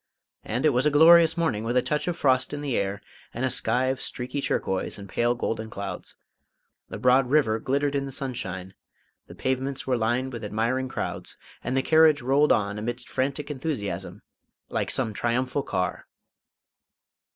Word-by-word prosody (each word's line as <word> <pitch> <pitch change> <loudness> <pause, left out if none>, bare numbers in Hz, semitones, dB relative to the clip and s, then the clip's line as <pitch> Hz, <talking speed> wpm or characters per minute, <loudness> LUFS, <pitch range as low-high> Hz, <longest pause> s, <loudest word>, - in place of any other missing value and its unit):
And 120 +7 -2
it - - +7
was 130 +1 +2
a - - +5
glorious 165 +2 +7
morning, 160 -11 0
with 120 +2 0
a 125 - +3
touch 150 +2 -1
of 175 -1 -1
frost 130 0 +2
in 145 - -5
the 140 -4 -2
air 100 +1 -2 0.3
and 120 +3 -1
a 130 - 0
sky 125 +2 +1
of 130 0 -1
streaky 130 +3 -4
turquoise 95 -7 -1
and 100 -1 -9
pale 120 +4 +1
golden 110 -2 -3
clouds; 100 -1 -6 0.7
the - - -6
broad 125 +3 +3
river 125 -7 +3
glittered 140 +4 0
in 140 -1 -1
the - - -6
sunshine; 95 - -5 0.5
the - - -12
pavements 130 +1 -2
were 130 - +1
lined 120 +3 0
with 115 -2 -6
admiring 115 +5 -1
crowds, - - -5 0.3
and 130 +2 -1
the 135 - +2
carriage 155 -3 +5
rolled 140 +4 +3
on 105 0 +1
amidst 120 +3 -5
frantic 140 +3 -2
enthusiasm, 135 -7 -4 0.5
like - - -1
some 120 -5 -1
triumphal 125 +6 0
car. 90 -8 -3
130 Hz, 175 wpm, -26 LUFS, 115-140 Hz, 0.7 s, it